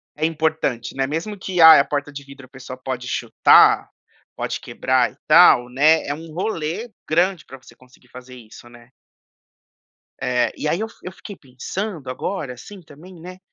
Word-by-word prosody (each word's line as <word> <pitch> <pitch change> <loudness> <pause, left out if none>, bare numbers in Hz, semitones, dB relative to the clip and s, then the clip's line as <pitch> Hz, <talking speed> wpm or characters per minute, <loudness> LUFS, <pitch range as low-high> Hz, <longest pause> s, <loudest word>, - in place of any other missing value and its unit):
é 155 +1 -1
importante, 155 -7 -2
né, 135 0 -1
mesmo 165 +8 -5
que: 185 -2 -2
"Ai, 160 -2 +9
a 140 - +2
porta 145 0 -4
de 140 0 -9
vidro 140 -1 -14
a - - -23
pessoa 130 -1 -11
pode 130 -1 -6
chutar, 120 -2 +3 0.5
pode - - -4
quebrar - - -1
e - - -26
tal", 120 0 +6
né, 150 +5 +3
é 145 - -2
um 160 +2 -11
rolê 175 +3 -4 0.2
grande 175 +1 0
pra 135 - -12
você 130 - -19
conseguir 130 0 -23
fazer 125 0 -13
isso, 120 0 -15
né. 120 0 -18 1.3
É. 125 -1 0
E - - -4
aí 165 +4 -1
eu 220 - -3 0.2
eu 180 - -7
fiquei 200 +2 -11
pensando 150 - -7
agora, 135 +1 -5
assim, 190 - -13
também, 165 +4 -16
né. 180 +2 -11
145 Hz, 180 wpm, -20 LUFS, 130-170 Hz, 1.3 s, Ai